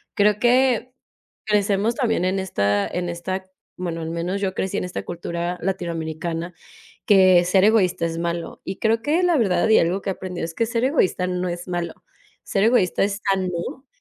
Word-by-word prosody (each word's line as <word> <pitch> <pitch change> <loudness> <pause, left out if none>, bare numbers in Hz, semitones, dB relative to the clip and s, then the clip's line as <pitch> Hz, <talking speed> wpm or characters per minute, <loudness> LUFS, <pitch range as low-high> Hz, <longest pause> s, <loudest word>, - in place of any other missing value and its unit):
creo 210 -1 +3
que 250 +1 +2 0.6
crecemos 210 +2 +2
también 225 -8 +1
en 185 +1 0
esta 100 - 0
en 175 0 -3
esta, 185 +2 -4 0.3
bueno 170 -2 -4
al 160 - -4
menos 175 +4 -2
yo 195 -2 -1
crecí 190 - -2
en - - -2
esta 180 - -5
cultura 170 +1 -4
latinoamericana, 170 -2 -3 0.5
que 185 -3 +6
ser 185 +2 +3
egoísta 200 -6 +3
es 165 0 -4
malo, 170 0 -4
y 190 - -5
creo 225 0 +2
que 315 +5 +1
la 350 -2 +3
verdad 190 -4 +2
y 220 - +6
algo 180 +4 +1
que 195 - -2
he - - -2
aprendido 180 -3 -5
es 165 0 -6
que 230 - 0
ser 230 0 -1
egoísta 225 - +1
no 180 0 -2
es 175 +1 -5
malo. 175 -2 -3 0.5
Ser 195 - 0
egoísta 220 -6 +3
es 200 +1 -2
sano, 185 +7 -3
185 Hz, 185 wpm, -22 LUFS, 170-210 Hz, 0.6 s, que